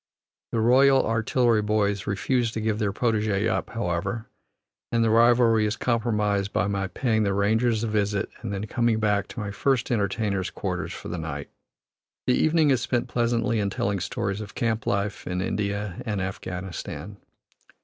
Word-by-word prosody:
The 115 - 0
Royal 135 +3 +5
Artillery 115 0 +2
boys 105 -2 0
refuse 115 +4 0
to - - -2
give 110 -1 -1
their 105 -3 +1
protege 110 -1 +1
up, 115 - -1
however, 100 +1 -2 0.7
and 115 -1 +2
the 110 - +2
rivalry 115 -1 +5
is 105 - -1
compromised 105 -4 0
by - - +1
my 100 -1 -1
paying 110 +1 0
the 100 -2 +1
Rangers 110 +3 +2
a - - 0
visit 105 -2 0
and 110 - -4
then 100 +1 -3
coming 115 0 +1
back 105 -2 +1
to - - -8
my 100 -1 -3
first 130 +3 0
entertainers' 100 -3 0
quarters - - -4
for - - -8
the 85 - -4
night. 75 -3 -5 0.7
The 125 - +3
evening 155 +1 +3
is 130 -3 +2
spent 120 0 -1
pleasantly 120 -1 +1
in 100 -1 0
telling 100 0 -1
stories 100 +3 -2
of 105 -1 -9
camp 115 -1 -1
life 100 +1 -1
in 90 0 -2
India 100 0 -2
and 105 -4 -2
Afghanistan. 95 -1 -5
105 Hz, 170 wpm, -25 LUFS, 100-115 Hz, 0.7 s, Royal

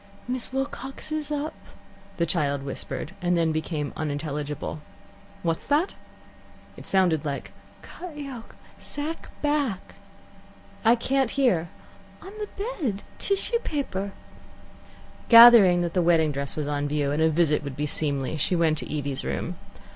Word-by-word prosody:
"Miss 250 0 -2
Wilcox 270 +2 -4
is 305 -1 -2
up 295 +1 -2 0.3
" 195 0 -25
the 170 - +2
child 145 -5 0
whispered, 140 +2 -5
and 175 0 +2
then 165 -1 +2
became 155 -2 -2
unintelligible. 150 0 -3 0.6
"What's 165 -1 -1
that?" 300 +7 +2 0.8
It - - -5
sounded 180 -6 +3
like, 140 -2 -4 0.2
" - - -26
cut 345 -4 -9
yoke 270 -6 -8 0.2
sack 305 +3 -4
back 285 -10 0 0.5
" 195 0 -25
"I 230 +1 +6
can't 265 +1 +1
hear." 225 -13 +2 0.3
" 195 0 -24
On 385 - -8
the 420 - -4 0.3
bed 210 -8 -1 0.2
tissue 400 +4 +1
paper 200 - -3 0.6
" - - -23 0.2
Gathering 230 -7 +9
that 170 -1 -2
the 180 - +2
wedding 165 -3 +3
dress 140 -1 -4
was 150 - -2
on 145 0 -1
view, 145 -1 0
and 150 +2 0
that 160 - +5
a - - +3
visit 155 -2 +2
would 140 -2 -5
be 150 - -1
seemly, 145 -1 -1
she 155 +5 +1
went 160 -2 +2
to - - -7
Evie's 140 -3 -3
room. - - -3
175 Hz, 160 wpm, -26 LUFS, -, 0.8 s, Gathering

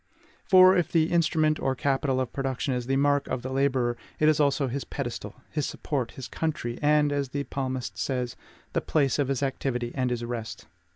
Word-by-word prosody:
For, 185 0 +7
if 175 -3 +1
the 160 -1 +2
instrument 155 -2 +2
or 135 0 0
capital 135 0 0
of 130 - -2
production 135 0 -1
is 125 -1 -3
the 135 - +1
mark 145 +1 +2
of 130 -1 -3
the 130 - -4
laborer, 130 -3 +1 0.2
it 155 - +3
is 155 -1 +4
also 140 -1 +2
his 135 +2 -3
pedestal, 120 -6 -5 0.2
his 150 -2 -1
support, 130 -6 -3
his 130 -3 -7
country, 120 -5 -3
and, 150 0 +3
as 140 -2 -1
the 140 +1 -3
Psalmist 130 -2 -3
says, 125 -3 -2 0.4
THE - - +1
PLACE 140 -3 +1
OF 140 - +2
HIS 135 0 -1
ACTIVITY 125 -3 -2
AND 130 -2 0
HIS 120 -1 -2
REST. 115 -2 -5
135 Hz, 195 wpm, -27 LUFS, 125-145 Hz, 0.4 s, For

